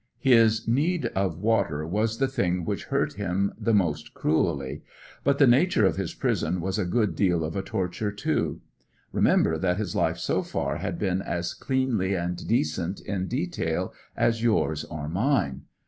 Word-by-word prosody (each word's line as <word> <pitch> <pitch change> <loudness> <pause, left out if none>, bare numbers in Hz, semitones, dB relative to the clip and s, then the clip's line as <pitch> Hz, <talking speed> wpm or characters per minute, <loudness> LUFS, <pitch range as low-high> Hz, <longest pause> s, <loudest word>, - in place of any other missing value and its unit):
His 115 -4 +4
need 150 +6 +1
of 95 -4 0
water 95 -7 +1
was 110 +6 0
the 135 - +2
thing 90 -9 -1
which - - -3
hurt - - 0
him 100 0 0
the 115 - -1
most 80 -8 0
cruelly; 75 -4 0 0.4
but 140 0 +2
the 140 - +6
nature 130 - +4
of - - +2
his - - -3
prison 90 +3 0
was 95 +4 -2
a 100 - 0
good 105 -2 +1
deal 90 -3 +2
of 80 +1 -4
a 95 - 0
torture, 95 +3 -2
too. 105 - -1 0.5
Remember 80 -1 +3
that 90 0 +1
his 100 -4 -3
life - - +1
so - - 0
far - - -2
had - - -3
been 95 -2 0
as 85 -2 -3
cleanly 125 -8 0
and 90 0 -3
decent 85 -3 0
in 95 -2 -3
detail 130 - -2 0.2
as 115 -1 +2
yours 105 -10 +1
or 75 -2 -6
mine. 95 - 0
95 Hz, 170 wpm, -26 LUFS, 85-115 Hz, 0.5 s, the